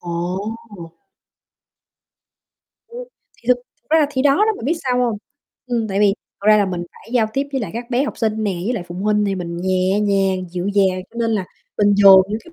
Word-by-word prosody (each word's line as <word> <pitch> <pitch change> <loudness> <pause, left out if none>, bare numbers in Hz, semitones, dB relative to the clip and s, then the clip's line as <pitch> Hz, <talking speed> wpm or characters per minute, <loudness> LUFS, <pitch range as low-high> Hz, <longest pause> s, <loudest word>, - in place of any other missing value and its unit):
Ồ. 180 +5 -4 2.3
Ừm, 485 +1 -8 0.4
thì - - -20
thực 250 - +5
thực 245 0 -27
ra 320 - +5
là 300 - +3
thì 260 -2 -1
đó 280 -1 +4
đó, 430 +2 +3
bạn - - -9
biết 290 - +1
sao 250 -2 0
hông? 235 -4 0 0.5
Ừm, 235 -3 -1
tại 195 0 -1
vì 200 -1 +4 0.3
thật 200 - -6
ra 215 - +7
là 205 -1 +2
mình 180 -2 -3
phải - - -17
giao 230 -3 +3
tiếp 275 +4 -1
với 270 - -1
lại 220 - -4
các 235 +2 -6
bé 245 +2 +2
học - - -6
sinh 220 -2 0
nè, 205 - 0
với 235 - 0
lại 205 - -3
phụ 175 - -7
huynh 210 +2 +1
nè, 200 -1 0
mình 170 -2 -5
nhẹ 185 +2 0
nhàng, 195 -3 0
dịu 180 +1 -4
dàng, 190 -2 +1
cho - - -16
nên 230 -1 0
là 210 -4 0 0.3
mình 205 -1 +4
dồn 195 -1 +8
những 215 +2 -2
cái 340 - -16
210 Hz, 230 wpm, -19 LUFS, 190-245 Hz, 2.3 s, dồn